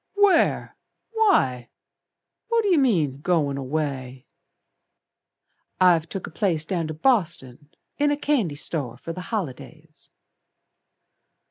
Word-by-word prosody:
"Where? 405 -4 +3 0.4
Why? 135 - +2 0.8
What 460 -2 +2
yer 360 -6 +4
mean 160 - +1
goin' 150 -5 +1
away?" 135 -2 -4 1.5
"I've 170 -3 +4
took 195 - -5
a - - -10
place 170 -5 0
Down 170 -3 -2
to 155 - -5
Boston, 155 - 0 0.3
in 290 0 +3
a 290 - 0
candy 255 - 0
store 145 -5 -3
For 165 +6 -7
the 180 - -7
holidays." 160 - -6
165 Hz, 110 wpm, -24 LUFS, 140-235 Hz, 1.5 s, yer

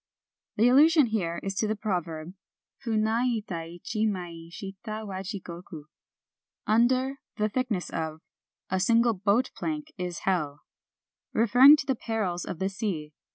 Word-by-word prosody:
The 225 +3 +4
allusion 300 +4 +6
here 185 -7 -1
is 195 - -2
to 215 - +1
the 215 - 0
proverb, 175 -5 -3 0.5
Funa 220 -1 +1
ita 210 -9 -2
ichi 210 +6 -2
mai 175 -4 -5
shita 215 +3 -7
wa 190 -2 -5
Jigoku: 175 -5 -7 0.8
"Under 255 +5 +2 0.2
[the 215 -1 +2
thickness 225 -6 -2
of] 160 -1 -4 0.5
a 190 - +1
single 230 +4 +4
boat 205 +5 +1
plank 310 -1 -4
is 180 -1 -4
hell," 150 -7 0 0.4
— - - -63
referring 245 +6 +8
to 275 - -4
the 270 - +1
perils 215 -7 -2
of 180 - -5
the 190 +2 -1
sea. 180 -7 -4
210 Hz, 145 wpm, -27 LUFS, 175-235 Hz, 0.8 s, referring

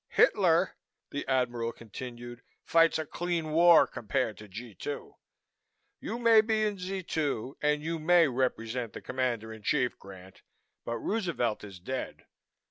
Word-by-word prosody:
Hitler," 175 -5 +3 0.3
the 145 - -4
Admiral 120 -3 0
continued, 120 +2 -9 0.2
"fights 165 0 +4
a 160 - -3
clean 170 0 -2
war 170 +1 +7
compared 115 -1 -2
to 105 - -11
G 110 +4 -9
2. 145 +10 -6 0.9
You 225 - -4
may 230 -2 +6
be 220 0 +1
in 205 -2 -2
Z 190 +1 -4
2 140 -6 -2
and 150 0 +1
you 165 +1 -2
may 170 +1 +5
represent 125 -2 -2
the - - -8
Commander 120 -4 -2
in 110 - -11
Chief, 125 +3 0
Grant, 95 -1 -13 0.4
but 115 - -2
Roosevelt 165 - -1
is 100 -3 -10
dead. 130 +9 -5
130 Hz, 145 wpm, -29 LUFS, 115-165 Hz, 0.9 s, war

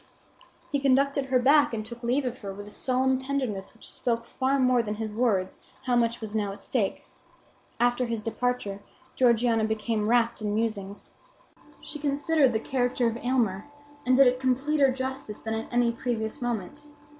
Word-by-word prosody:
He 285 - +1
conducted 275 +1 +2
her 260 -1 +2
back 280 0 +4
and 215 -1 -4
took 235 +1 -10
leave 255 +3 0
of 250 0 -4
her 200 -2 -6
with 200 +1 -8
a - - -11
solemn 260 +2 +1
tenderness 260 -8 -3
which - - -12
spoke 230 -1 -2
far 265 +3 0
more 255 -2 +3
than 210 -2 -4
his 215 0 -4
words 210 -5 0 0.2
how 250 -2 +1
much 235 -1 +1
was 220 -1 -6
now 205 -2 0
at - - -11
stake. 220 -7 -1 0.7
After 245 +1 +2
his 230 -2 -3
departure 225 -3 -2 0.4
Georgiana 235 -2 +3
became 220 0 -1
rapt 235 -1 +2
in 210 -1 -1
musings. 205 -3 -3 0.7
She 300 - -7
considered 290 -1 +2
the 220 - 0
character 245 0 0
of 230 0 0
Aylmer, 235 -6 0 0.4
and 255 0 +3
did 275 +1 +7
it 250 0 +3
completer 270 +2 +2
justice 260 -4 -4
than 220 - -3
at 225 0 -4
any 240 -1 +3
previous 230 +1 -3
moment. 245 +5 -4
245 Hz, 175 wpm, -27 LUFS, 220-260 Hz, 0.7 s, did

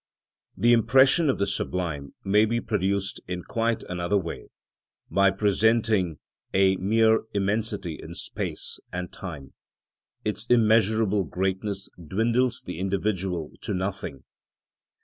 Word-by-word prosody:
The 120 +1 +5
impression 135 - +5
of 130 - +1
the 100 - +1
sublime 85 -7 -3
may 105 +2 +4
be 115 +2 0
produced 100 -2 -1
in 90 -1 -4
quite 115 +3 -1
another 90 +3 -1
way, 85 -4 -5 0.6
by 100 0 +4
presenting 105 -3 +2 0.4
a 95 0 +4
mere 110 +3 +3
immensity 100 -4 -1
in - - -9
space - - -4
and 90 0 -5
time; 75 -8 -8 0.7
its 105 +2 0
immeasurable 110 -3 +3
greatness 95 +5 -2 0.2
dwindles 115 +8 +1
the 90 -2 -6
individual 95 -4 -1
to - - -3
nothing. 95 -7 -4
100 Hz, 115 wpm, -26 LUFS, 90-110 Hz, 0.7 s, The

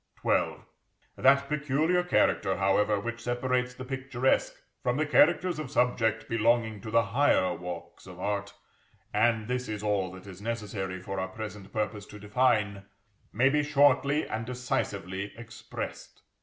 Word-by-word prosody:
XII. - - +2 0.6
That 140 +1 +4
peculiar 150 +4 +1
character, 95 - +2
however, 100 +2 +2
which 115 +2 -5
separates 125 +1 -1
the 130 - -7
picturesque 130 -1 0 0.3
from 125 +1 0
the 155 - +1
characters 175 +3 +3
of 150 -4 -5
subject 115 -3 +1
belonging 115 -2 +1
to 110 - -7
the 115 +1 +4
higher 115 -5 +2
walks 90 +1 -8
of 90 -1 -11
art 100 +1 -2 0.6
(and 110 0 +2
this 125 0 -2
is 105 -1 -4
all 100 -3 0
that 95 +1 -11
is 95 -1 -10
necessary 105 -4 -4
for 95 +1 -5
our 95 - -1
present 105 -1 -8
purpose 105 -1 -3
to 105 - -11
define), 105 -2 +1 0.5
may 125 +5 +3
be 150 +2 +2
shortly 145 0 +3
and 110 +1 -4
decisively 100 -6 -3
expressed. 115 -1 -8
115 Hz, 145 wpm, -29 LUFS, 100-130 Hz, 0.6 s, That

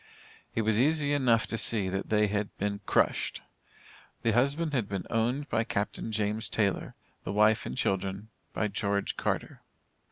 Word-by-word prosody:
It 115 - +1
was 110 0 +2
easy 145 +1 +2
enough 120 -6 +3
to 115 - -3
see, 105 -5 +1
that 95 +1 -3
they 105 -1 +4
had 105 0 -2
been 100 0 -2
crushed. - - +1 0.8
The 115 - +3
husband 140 +7 +1
had 120 -7 0
been 95 -2 -3
owned 120 +6 0
by 110 - +1
Captain 105 +1 -2
James 105 0 0
Taylor 100 -3 0 0.3
the - - -3
wife 105 +2 +3
and - - -5
children 95 -1 -1 0.2
by 105 - 0
George 100 0 -1
Carter. - - -2
110 Hz, 160 wpm, -29 LUFS, 100-120 Hz, 0.8 s, they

